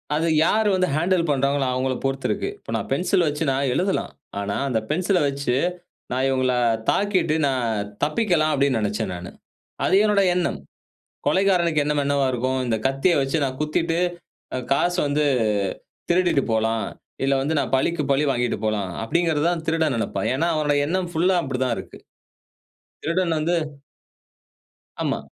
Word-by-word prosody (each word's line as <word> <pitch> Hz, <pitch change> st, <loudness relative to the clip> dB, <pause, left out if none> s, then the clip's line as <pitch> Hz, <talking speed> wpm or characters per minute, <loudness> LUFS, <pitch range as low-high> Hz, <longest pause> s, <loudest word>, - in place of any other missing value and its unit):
அது 165 Hz, +2 st, +1 dB, 0.2 s
யார் 215 Hz, +2 st, +2 dB
வந்து 185 Hz, 0 st, +2 dB
ஹேண்டில் 170 Hz, 0 st, +1 dB
பண்ணுறாங்களோ 140 Hz, 0 st, +1 dB
அவங்கள 130 Hz, +1 st, 0 dB
பொறுத்து 135 Hz, 0 st, -1 dB
இருக்கு. -, -, -1 dB
இப்போ -, -, -9 dB
நான் -, -, -3 dB
பென்சில் 180 Hz, -1 st, +2 dB
வச்சு 150 Hz, +2 st, -1 dB
நான் 135 Hz, 0 st, 0 dB
எழுதலாம். 190 Hz, +5 st, 0 dB, 0.3 s
ஆனா 100 Hz, 0 st, -2 dB
அந்த 115 Hz, -3 st, +1 dB
பென்சில 180 Hz, +4 st, +1 dB
வச்சு 140 Hz, -2 st, -1 dB, 0.6 s
நான் 130 Hz, +1 st, 0 dB
இவங்கள 130 Hz, -1 st, +1 dB, 0.4 s
தாக்கிட்டு 190 Hz, -6 st, +1 dB
நான் 115 Hz, -6 st, -1 dB, 0.2 s
தப்பிக்கலாம், 155 Hz, -2 st, +2 dB
அப்படின்னு 140 Hz, -4 st, +2 dB
நினைச்சேன் 105 Hz, -1 st, -2 dB
நானு. 90 Hz, 0 st, -7 dB, 0.6 s
அது -, -, +2 dB
என்னோட 210 Hz, -2 st, +3 dB
எண்ணம். 180 Hz, -1 st, -1 dB, 0.7 s
கொலைக்காரனுக்கு 175 Hz, -5 st, +3 dB
எண்ணம் 150 Hz, 0 st, 0 dB
என்னவா 140 Hz, -1 st, +1 dB
இருக்கும், 130 Hz, +2 st, -1 dB
இந்த 115 Hz, -2 st, +1 dB
கத்திய 135 Hz, +7 st, +2 dB
வைச்சு 135 Hz, +4 st, 0 dB
நான் 130 Hz, 0 st, -3 dB
குத்திட்டு, 165 Hz, +2 st, 0 dB, 0.6 s
ஆ 130 Hz, -, -1 dB
காசு 175 Hz, +6 st, +1 dB
வந்து 150 Hz, +1 st, +1 dB, 0.9 s
திருடிட்டு 175 Hz, -5 st, +3 dB
போலாம். 110 Hz, 0 st, +1 dB, 0.4 s
இல்ல 135 Hz, 0 st, +3 dB
வந்து 150 Hz, +4 st, -1 dB
நான் -, -, -3 dB
பழிக்கு 155 Hz, +4 st, 0 dB
பழி 140 Hz, +2 st, +2 dB
வாங்கிட்டு 120 Hz, -1 st, -1 dB
போலாம் 105 Hz, -3 st, -1 dB
அப்படிங்கிறது 160 Hz, +5 st, +1 dB
தான் 170 Hz, -2 st, -2 dB
திருடன் 160 Hz, -3 st, +1 dB
நினைப்பான். 100 Hz, -3 st, -2 dB
ஏன்னா 160 Hz, +6 st, +1 dB
அவனோட 150 Hz, -1 st, +1 dB
எண்ணம் 180 Hz, +2 st, -1 dB
ஃபுல்லா 180 Hz, +3 st, +2 dB
அப்படித்தான் 130 Hz, -3 st, -1 dB
இருக்கு. -, -, -10 dB, 1.0 s
திருடன் 170 Hz, +1 st, 0 dB
வந்து 165 Hz, +3 st, 0 dB, 1.5 s
ஆமா. -, -, 0 dB
145 Hz, 150 wpm, -23 LUFS, 130-170 Hz, 1.5 s, என்னோட